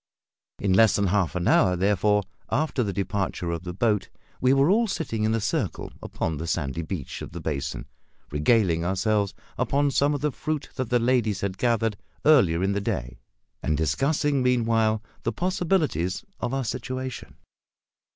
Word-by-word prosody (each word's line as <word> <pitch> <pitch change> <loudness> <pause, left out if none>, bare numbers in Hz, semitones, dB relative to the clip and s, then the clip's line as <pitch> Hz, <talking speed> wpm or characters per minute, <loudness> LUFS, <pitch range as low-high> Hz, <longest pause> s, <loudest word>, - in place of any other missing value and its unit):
In 95 -2 +1
less 110 +2 +5
than 100 - +2
half 95 -5 +1
an 90 0 -1
hour, 90 -1 +4
therefore, 105 +2 +2 0.3
after 150 -3 0
the 105 -4 0
departure 95 -2 -2
of 85 -1 -3
the 90 0 -5
boat 105 +2 0 0.3
we 130 - +4
were 135 +1 +4
all 230 +3 +3
sitting 135 - -2
in 110 +1 +2
a - - +1
circle 105 - -2
upon 80 -2 -3
the 80 +3 -5
sandy 75 -2 -1
beach 80 -3 -5
of - - -8
the 85 - -5
basin, 75 -2 -3 0.5
regaling 85 +2 +2
ourselves 100 +3 0 0.2
upon 140 0 +2
some 145 +2 +2
of 140 - -4
the 150 0 +1
fruit 155 +3 -3
that 130 -3 -3
the 125 - +3
ladies 120 -4 +1
had 95 -1 -3
gathered 115 -3 +1 0.3
earlier 95 - +5
in 95 - +2
the 100 0 -1
day, 60 -9 -3 0.4
and 75 - 0
discussing, 140 - +1
meanwhile, 115 -3 +2 0.2
the 115 - -1
possibilities 175 - 0
of - - -2
our 135 0 -1
situation. 130 +2 -5
105 Hz, 170 wpm, -25 LUFS, 90-130 Hz, 0.5 s, less